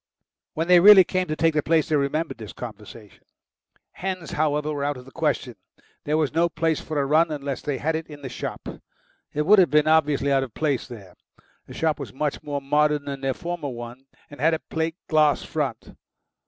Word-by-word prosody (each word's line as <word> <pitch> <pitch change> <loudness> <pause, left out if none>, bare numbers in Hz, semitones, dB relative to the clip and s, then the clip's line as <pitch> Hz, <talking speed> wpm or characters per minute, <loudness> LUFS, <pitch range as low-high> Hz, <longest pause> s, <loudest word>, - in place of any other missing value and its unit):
When 160 +2 -1
they 180 -1 +7
really 195 +1 +9
came 185 +1 -2
to 155 - -2
take 165 0 +2
the 150 - +1
place 160 0 +1
they 155 - +1
remembered 145 0 -1
this 110 -2 -8
conversation. 105 -3 -11 0.7
Hens, 185 -3 -5
however, 150 0 0
were 145 -1 -3
out 145 -1 -1
of 125 - -12
the 135 - -14
question; 145 -6 -2 0.5
there 150 +1 +1
was 155 -3 0
no 170 +1 +2
place 165 -1 -1
for 155 -2 -3
a 140 - +1
run 160 +4 +3
unless 140 -2 -4
they 145 -2 -3
had 160 +4 -1
it 160 0 -4
in 145 -2 -12
the - - -4
shop. - - -6 0.6
It 150 +1 -1
would 205 +4 +6
have 180 - +5
been 150 +2 +3
obviously 150 -3 +2
out 135 -1 +3
of 130 -5 -6
place 145 -5 -1
there. 100 -8 -11 0.5
The - - -11
shop 160 -2 0
was 140 - -7
much 145 +2 -2
more 145 -1 -4
modern 150 +1 +1
than 140 -1 -5
their 135 -1 -1
former 170 -4 -5
one, 120 +2 -9 0.2
and 145 - -10
had 160 +2 +3
a - - -5
plate 160 0 -1
glass 155 -2 +3
front. 145 -7 -4
150 Hz, 210 wpm, -24 LUFS, 135-160 Hz, 0.7 s, really